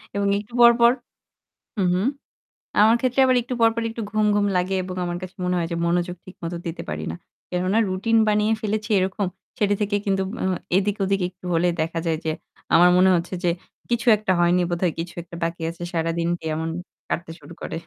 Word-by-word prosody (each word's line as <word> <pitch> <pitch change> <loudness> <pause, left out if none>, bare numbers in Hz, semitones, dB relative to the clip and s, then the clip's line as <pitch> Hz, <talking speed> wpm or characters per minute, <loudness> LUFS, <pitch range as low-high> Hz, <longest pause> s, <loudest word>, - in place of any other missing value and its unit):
এবং 200 0 +1
একটু 215 +3 -12
পর, 235 0 +10
পর 235 +1 +8 0.9
হুম, 190 - +2
হুম। 195 +7 +1 0.7
আমার 220 +2 +6
ক্ষেত্রে 255 +1 +1
আবার 255 - +4
একটু 250 +1 -4
পর, 225 0 +6
পর 230 - -2
একটু 230 0 -5
ঘুম, 215 0 +1
ঘুম 205 0 +2
লাগে 180 +2 0
এবং 185 0 -6
আমার 175 0 -3
কাছে 185 0 -8
মনে 180 0 0
হয় 165 -1 -1
যে 170 - -1
মনোযোগ 175 +1 0
ঠিক 185 - -13
মতো 170 +1 -3
দিতে 165 0 -4
পারি 75 0 -4
না। - - -6 0.3
কেননা 185 +4 +1
রুটিন 200 +5 +1
বানিয়ে 210 +1 +2
ফেলেছি 215 +1 -2
এরকম। 190 +1 0 0.3
সেটি 205 -1 +2
থেকে 205 0 0
কিন্তু 195 -1 +1 0.2
ও - - -1 0.3
এদিক-ওদিকে 195 -1 +1
একটু 180 0 -14
হলে 175 +2 +3
দেখা 165 +1 -1
যায় 160 -1 +1
যে 160 - 0 0.4
আমার 175 +1 +7
মনে 185 +1 +5
হচ্ছে 170 +2 -3
যে, 175 - +3 0.4
কিছু 235 +1 0
একটা 210 -3 0
হয়নি 175 +1 +4
বোধহয় 175 -1 0
কিছু 170 +1 -5
একটা 170 0 -11
বাকি 165 +1 -3
আছে 170 +1 -10
সারাদিন 165 0 -1
দিয়ে 160 - -4
এমন 160 +1 -2 0.4
কাটতে 170 -1 -3
শুরু 155 +3 -12
করে। - - -4
185 Hz, 205 wpm, -23 LUFS, 170-210 Hz, 0.9 s, পর